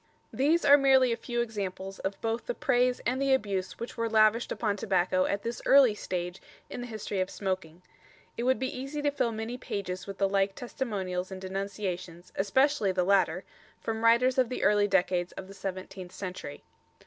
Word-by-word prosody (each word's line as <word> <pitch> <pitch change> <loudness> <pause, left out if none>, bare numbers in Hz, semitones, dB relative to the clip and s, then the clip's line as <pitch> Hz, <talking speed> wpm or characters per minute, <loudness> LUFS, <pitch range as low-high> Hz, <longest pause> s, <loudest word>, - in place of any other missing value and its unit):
_ - - -39 0.3
These 305 +5 +2
are 285 0 +8
merely 265 -2 +5
a - - +1
few 240 +1 -2
examples 195 -4 -4
of 195 +1 -4
both 225 +1 -2
the - - -2
praise 250 0 +2
and 255 +3 0
the 275 -1 +4
abuse 195 -6 -3
which 235 - -7
were 230 0 0
lavished 220 +1 +3
upon 210 -3 0
tobacco 185 -2 +1
at 200 0 -2
this 235 +1 -4
early 270 -5 +6
stage 180 -3 -4 0.3
in - - -5
the 245 - -5
history 215 -4 -3
of 185 - -1
smoking. 185 -3 -4 0.5
It - - -4
would 260 +2 +2
be 260 0 -3
easy 275 +3 -5
to 290 - +2
fill 245 -4 0
many 225 +3 -5
pages 185 -5 -4
with 195 -1 -6
the 195 - +2
like 195 0 +1
testimonials 195 -7 -3
and 190 - -6
denunciations, 185 -2 -5
especially 220 +2 +2
the 185 -1 +1
latter, 185 -2 +2 0.4
from 225 0 -3
writers 250 +3 +4
of 250 -3 +3
the 255 - -3
early 205 0 +4
decades 180 -2 +1
of 185 - -8
the 195 - -11
seventeenth 190 -1 -6
century. 180 -6 -7
205 Hz, 195 wpm, -29 LUFS, 190-245 Hz, 0.5 s, are